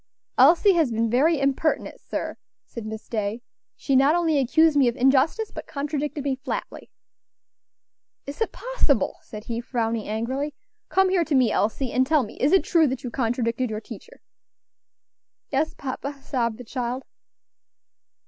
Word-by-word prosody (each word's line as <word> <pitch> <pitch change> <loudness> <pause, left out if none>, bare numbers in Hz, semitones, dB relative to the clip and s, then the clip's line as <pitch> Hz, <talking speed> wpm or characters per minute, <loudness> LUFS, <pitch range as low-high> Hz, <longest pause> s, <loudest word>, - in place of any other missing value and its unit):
"Elsie 335 +9 +6
has 320 -8 +2
been 225 0 0
very 295 +6 +3
impertinent, 275 +3 0
sir," - - -4 0.3
said 230 -2 -8
Miss 220 0 -7
Day; 220 +1 -3 0.3
"she 275 - -1
not 275 +4 +5
only 325 -4 +2
accused 315 +4 +4
me 275 -3 +5
of 240 - 0
injustice, 275 - +2
but - - -8
contradicted 290 0 -3
me 275 -1 0
flatly." 270 - -6 1.4
"Is 280 +10 -8
it 450 - +1
possible!" - - 0
said 215 -1 -10
he, 235 0 -4
frowning 230 -3 -2
angrily. 260 +7 -2 0.3
"Come 385 0 +3
here 370 -2 +2
to 310 - 0
me, 250 -4 +4
Elsie, 230 +5 0
and 260 0 +2
tell 305 -2 +3
me, 210 - -9
is 280 - +2
it 385 - +5
true 325 -3 +3
that 260 0 -3
you 245 - -5
contradicted 235 0 -1
your 215 -1 -3
teacher?" 485 - -12 1.3
"Yes, 295 +3 0
papa," 275 +1 -5
sobbed 235 -5 -1
the 250 - -9
child. 250 +1 -4
270 Hz, 160 wpm, -24 LUFS, 235-305 Hz, 1.4 s, Elsie